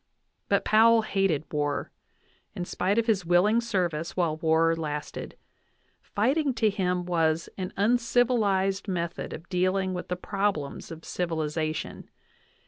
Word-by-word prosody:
But - - +2
Powell 225 +1 +5
hated 195 -8 0
war, 145 -1 -1 0.6
in 175 - -3
spite 190 +4 -1
of 230 - +2
his 215 -5 +1
willing 180 +7 +3
service 180 -9 -2
while 165 -4 +1
war 165 0 +3
lasted; 150 -2 -5 0.6
fighting 275 +9 0
was 265 - 0
to 220 -3 +3
him 180 -3 -1 0.6
an - - -14
uncivilized 215 -3 +2
method 170 -2 -3
of 165 +3 -8
dealing 185 +1 0
with 180 - -5
the 180 - -2
problems 195 -6 -2
of 165 0 -9
civilization. 160 -2 -3
185 Hz, 130 wpm, -27 LUFS, 165-210 Hz, 0.6 s, Powell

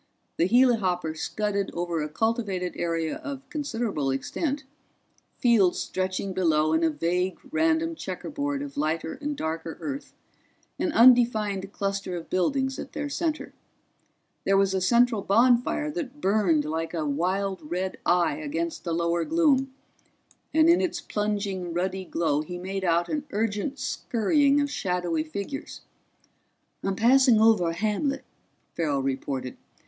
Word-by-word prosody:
The 170 - +3
helihopper 195 -10 +3
scudded 200 +3 -2
over 170 -2 -1
a 150 - -3
cultivated 195 -1 -1
area 165 -2 -1
of 275 -1 -7
considerable 230 - -2
extent, 270 - -2 0.7
fields 220 -7 +4
stretching 185 +1 -2
below 160 -4 +2
in 160 +1 +2
a 165 - +4
vague 175 +5 -1
random 320 +1 +2
checkerboard 285 - -4
of 285 - -8
lighter 155 +2 -2
and 290 0 -3
darker 160 +1 -4
earth, 280 -1 -6 0.6
an 345 - 0
undefined 220 -5 +4
cluster 195 -2 -3
of 165 - -9
buildings 265 +9 0
at - - -7
their 290 0 -3
center. 315 +1 -2 0.9
There 195 0 +3
was 195 -1 +3
a 190 - 0
central 235 +2 +3
bonfire 245 +8 +3
that 295 -3 -5
burned 190 - +2
like 165 +2 -3
a 160 -2 -1
wild 185 +5 -1
red 180 +5 -3
eye 170 -4 +2
against 160 +2 -3
the 170 - -2
lower 170 0 +1
gloom, 275 - +2 0.8
and 315 +1 +4
in 340 +1 +5
its 365 - -1
plunging 200 -4 -2
ruddy 185 +1 -2
glow 155 -4 0
he 175 +3 -6
made 190 +2 -4
out 170 -1 +2
an 300 -1 -3
urgent 225 +4 -2
scurrying 280 +1 +1
of 285 0 -1
shadowy 175 - -1
figures. 200 - -6 1.0
"I'm 195 0 -1
passing 245 +1 +5
over 215 -6 +4
a - - -2
hamlet," 215 - -1 0.5
Farrell 145 -5 0
reported. 130 -1 -3
195 Hz, 140 wpm, -26 LUFS, 170-255 Hz, 1.0 s, in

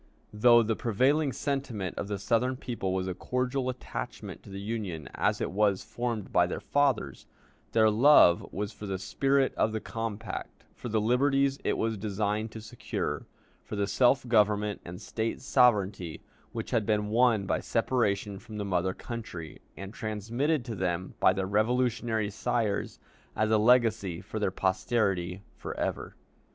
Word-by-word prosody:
Though 120 +2 +6
the 110 0 0
prevailing 135 +7 +2
sentiment 130 -10 -3
of - - -4
the 100 -1 -2
Southern 125 +5 +1
people 115 -7 -3
was 95 0 -1
a 95 - -2
cordial 125 +6 -1
attachment 120 - -6
to - - -14
the 100 0 -6
Union 100 -8 -4
as - - +1
it - - -2
was 100 -1 +2
formed 120 -4 -4
by 90 -1 +4
their - - -4
fathers, 135 - 0 0.5
their 110 -1 +5
love 110 -5 +6
was 105 +1 -3
for 105 -1 -9
the 95 -1 -2
spirit 135 +8 +1
of 110 - +1
the 110 - -1
compact, 115 -2 -5
for 120 - -7
the 110 0 +1
liberties 135 +4 +2
it - - 0
was 110 -2 -1
designed 105 +1 -1
to 110 - -7
secure, 110 - -4 0.3
for - - -7
the 100 -1 +1
self 125 +5 +3
government 105 -2 +2
and 90 +1 -8
State 115 0 -3
sovereignty 100 - +2 0.3
which - - -5
had 115 -3 +2
been 105 -1 +1
won 115 -2 +3
by - - 0
separation 105 -4 0
from 110 0 -10
the 105 - -3
mother 95 -1 0
country, 90 -9 -7 0.2
and 95 +2 -7
transmitted 115 +7 -1
to 115 - -4
them 90 -2 -2
by - - +6
their 95 0 -1
Revolutionary 110 +1 +1
sires 115 -1 -1 0.4
as 110 0 +1
a 110 - +4
legacy 110 -6 +3
for 110 - -6
their 100 -2 +1
posterity 95 -1 0
for - - -7
ever. - - -3
110 Hz, 165 wpm, -29 LUFS, 100-120 Hz, 0.5 s, Though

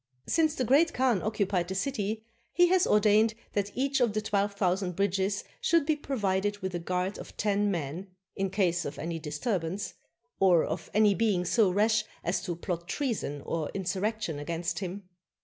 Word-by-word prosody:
Since 315 -2 +2
the 255 - 0
Great 300 +8 +4
Khan 245 -7 +2
occupied 200 -5 0
the 190 - -4
city, 215 0 -2 0.3
he 355 0 +4
has 370 0 +4
or 210 - +5
dained 215 +1 +4 0.2
that 200 -1 0
each 275 +1 +1
of 235 -4 +3
the 215 - 0
twelve 205 -1 0
thousand 185 -2 0
bridges 195 +1 0 0.2
should 335 -3 +3
be 310 0 +2
provided 205 -8 -1
with 190 -2 -4
a 175 - -2
guard 180 +3 -2
of - - -10
ten 205 0 +1
men, 170 +1 -3 0.3
in 195 0 -1
case 180 -3 +1
of 145 -1 -6
any 165 +2 -4
disturbance, 165 +4 -2 0.5
or 180 -4 +5
of - - -4
any 210 -1 +5
being 200 -4 +1
so 210 +2 +3
rash 215 +3 +3 0.2
as 175 +2 0
to 175 - -2
plot 170 0 -4
treason 220 - -2
or 160 -3 -2
insurrection 195 -2 -2
against 165 +2 -3
him. 190 0 -6
200 Hz, 180 wpm, -29 LUFS, 180-220 Hz, 0.5 s, or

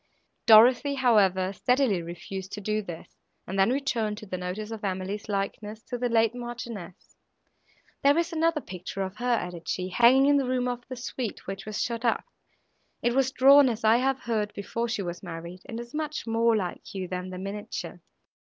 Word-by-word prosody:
Dorothée, 245 +5 +7
however, 195 -7 +3
steadily 250 -3 +2
refused 180 +3 -7
to 210 - -4
do 215 +1 -1
this, 175 -5 -10 0.3
and 195 +2 -3
then 195 - +5
returned 240 -6 -1
to 215 - -9
the 185 - -5
notice 185 +4 -5
of 220 -2 -7
Emily's 195 +2 -3
likeness 210 +2 -3
to 245 - -5
the 245 0 0
late 225 -1 +3
Marchioness. 240 -7 -8 0.9
"There 285 +2 +4
is 340 +1 0
another 325 -1 +1
picture 185 0 -5
of 190 +2 -6
her," 245 +2 -3
added 175 -5 -5
she, 185 0 -2
"hanging 240 +7 +5
in 285 0 +4
a - - -2
room 250 0 0
of 245 0 -3
the 255 - -5
suite, 245 -2 -5
which 195 +1 -6
was 215 -1 -4
shut 235 -1 -3
up. 230 -2 +1 0.8
It 240 - +2
was 265 0 +2
drawn, 275 0 +7
as 230 0 -4
I 220 +1 +6
have 270 +1 0
heard, 215 -3 -2
before 230 +4 -3
she 225 -3 -2
was 175 -1 -5
married, 170 0 -8
and 230 -3 -5
is 235 +1 -9
much 305 -1 -3
more 230 0 +2
like 185 0 -5
you 185 -1 -3
than 180 0 -4
the 185 - -6
miniature." 200 +2 -6
220 Hz, 190 wpm, -27 LUFS, 190-245 Hz, 0.9 s, Dorothée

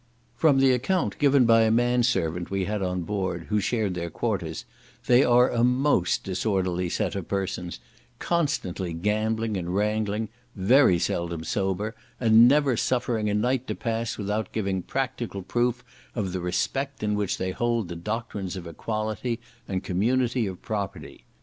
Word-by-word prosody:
From 150 -4 +4
the 135 -1 +5
account 150 +9 0
given 140 -3 +5
by 115 0 +6
a 110 - +4
man 120 +2 +3
servant 90 -7 0
we 95 -1 -1
had 105 +1 -2
on 90 -1 -1
board, 95 -3 -3
who 105 0 +2
shared 105 -2 0
their 85 -1 -4
quarters, - - -3 0.4
they 125 +2 +5
are 125 +1 +5
a 120 -1 +1
most 125 -6 +2
disorderly 90 -2 -1
set - - -1
of 95 -3 -5
persons, 95 -3 -3 0.4
constantly 100 - -1
gambling 110 +4 0
and 90 0 -3
wrangling, 105 +1 0 0.3
very 105 0 +5
seldom 85 -1 -2
sober, 100 +5 -1 0.3
and 115 0 +7
never 140 -1 +4
suffering 120 -3 0
a 105 - 0
night 125 +4 0
to - - -2
pass 115 -1 -2
without 105 +1 -2
giving 95 -3 -1
practical 125 -3 -3
proof 120 +4 0 0.3
of 100 -6 -2
the 95 - -2
respect 135 +10 -2
in 105 0 +1
which 105 -2 -1
they 95 0 -2
hold 115 0 0
the 85 - -6
doctrines 100 0 -4
of 90 -2 -7
equality, 110 +6 -3 0.3
and 95 -1 -2
community 120 +5 +1
of 95 -2 -6
property. 100 -2 -5
105 Hz, 160 wpm, -26 LUFS, 95-120 Hz, 0.4 s, and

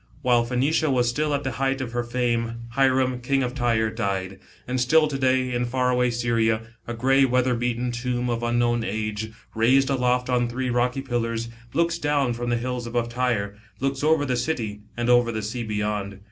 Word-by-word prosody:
While 120 -2 +3
Phoenicia 140 +6 +1
was 125 -3 +2
still 150 +6 0
afc 145 -1 0
the 130 - -2
height 135 +3 0
ofMier 120 -2 -3
fame, 120 -1 -1
Hiram, 130 0 +2
King 135 +2 +1
of 125 0 -2
Tyre, 115 -4 +1
died. 95 -4 -3 0.3
And 125 0 -1
still 155 +5 +4
to 145 - -4
day 130 -1 +2
5 120 0 -1
in - - +1
far 125 +1 +1
away 125 0 +2
Syria, 115 -2 +1 0.3
& 120 0 -4
grey 135 +3 +4
weather 125 -1 +2
beaten 120 +1 -1
tomb 120 +1 -2
of 120 -1 -1
unknown 120 0 +1
age, 110 0 -3 0.2
raised 130 +5 +3
aloft 125 -1 +1
on 125 -1 +1
three 125 +1 -2
rocky 125 +2 +1
pillars, 115 -3 -2 0.3
looks 170 +1 +1
down 145 -5 +1
from 120 +1 -3
the 120 - +1
hills 125 0 -3
above 120 0 -1
Tyre 120 -5 -1 0.2
looks 135 +1 -1
over 155 -1 +3
the 125 -2 0
city 115 -6 -2 0.2
and 120 0 -1
over 120 -1 +4
the 110 -1 -3
sea 115 +4 -4
beyond. 105 -2 -2
120 Hz, 195 wpm, -24 LUFS, 115-130 Hz, 0.3 s, still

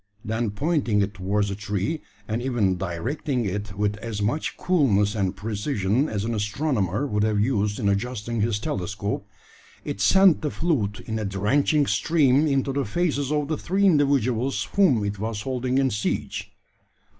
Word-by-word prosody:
Then 110 +1 -1
pointing 130 -1 0
it 100 +1 -3
towards 100 +1 -1
the 100 - -3
tree, 105 - -2 0.3
and 110 +2 -2
even 120 -7 +1
directing 115 - -2
it 100 0 -4
with 105 0 0
as 110 -1 -5
much 115 +10 -1
coolness 110 - +2
and 95 -4 -1
precision 110 +3 0
as 105 -1 -2
an 115 - -1
astronomer 105 - -1
would 105 -7 -1
have 105 -1 +1
used 105 -2 0
in 105 - 0
adjusting 115 +2 -1
his 110 -1 +1
telescope, 100 0 -3 0.6
it 100 - -4
sent 190 - +5
the 150 - -1
fluid 130 - -1
in 110 0 -3
a 105 - -2
drenching 130 +10 +2
stream 150 -2 +3
into 135 -1 +1
the 140 0 0
faces 145 - -1
of 150 -1 0
the 155 0 -1
three 195 +3 +1
individuals 135 - +2
whom 140 - +4
it 100 0 -3
was 110 0 -3
holding 130 0 -1
in 135 -1 +2
siege. 105 0 -3
115 Hz, 165 wpm, -24 LUFS, 105-140 Hz, 0.6 s, sent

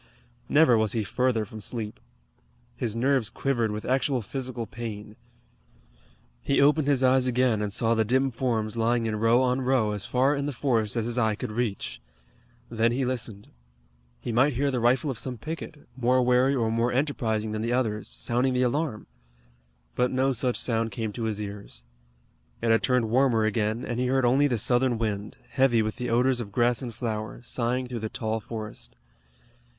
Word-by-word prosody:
Never 145 -7 +5
was 110 -1 +1
he 115 -2 0
further 115 +2 0
from 110 +1 -10
sleep. 110 0 -5 0.8
His 115 -3 -2
nerves 130 -1 +1
quivered 120 -5 0
with 105 0 -5
actual 130 -1 +1
physical 125 0 -4
pain. 110 -2 -7 1.3
He 140 - +1
opened 145 +1 +4
his 135 -3 +2
eyes 130 0 +4
again 125 -3 +2
and 105 -1 -2
saw 115 +3 +1
the 110 -1 +2
dim 130 +4 +1
forms 115 -3 -1
lying 115 0 +1
in 110 -1 -1
row 115 +4 +4
on 125 +1 +1
row 125 -4 +2
as 105 -1 -4
far 135 +3 +2
in 140 0 -2
the 145 - -3
forest 115 -4 0
as 115 -2 0
his 120 +1 -1
eye 110 -3 +2
could 105 - -5
reach. 100 - -3 0.7
Then 115 0 +1
he 130 +2 0
listened. 115 -5 -3 0.7
He 90 - -4
might 130 +5 +3
hear 140 +3 0
the 125 - -1
rifle 125 +5 +2
of 120 - -6
some 125 +1 -4
picket, 155 +3 -7
more 125 0 +2
wary 125 +2 +3
or 115 -3 0
more 115 +2 +1
enterprising 115 -6 -1
than 110 0 -3
the 115 +2 -1
others, 110 -4 -1
sounding 125 +2 0
the 125 - +2
alarm. 125 -3 -1 0.9
But 125 - +1
no 130 +1 +1
such 125 +1 0
sound 115 -2 0
came 110 0 -4
to 115 0 -3
his 110 -2 -2
ears. 100 -11 -7 0.8
It 115 -1 +1
had 115 - +4
turned 125 -4 +1
warmer 120 -3 +3
again, 110 +2 -1
and 120 0 -3
he 125 - +1
heard 130 0 +2
only 135 +4 +4
the 125 -4 0
Southern 120 +2 +2
wind, 105 -2 -3
heavy 130 -4 +3
with 110 +1 -3
the 125 0 -3
odors 125 +2 +2
of 100 -3 -7
grass 120 +3 +2
and 125 -3 -5
flower, 110 -1 -4
sighing 125 +1 -1
through 125 -1 -5
the 110 0 -4
tall 110 0 -2
forest. 110 - -8
120 Hz, 185 wpm, -26 LUFS, 110-130 Hz, 1.3 s, Never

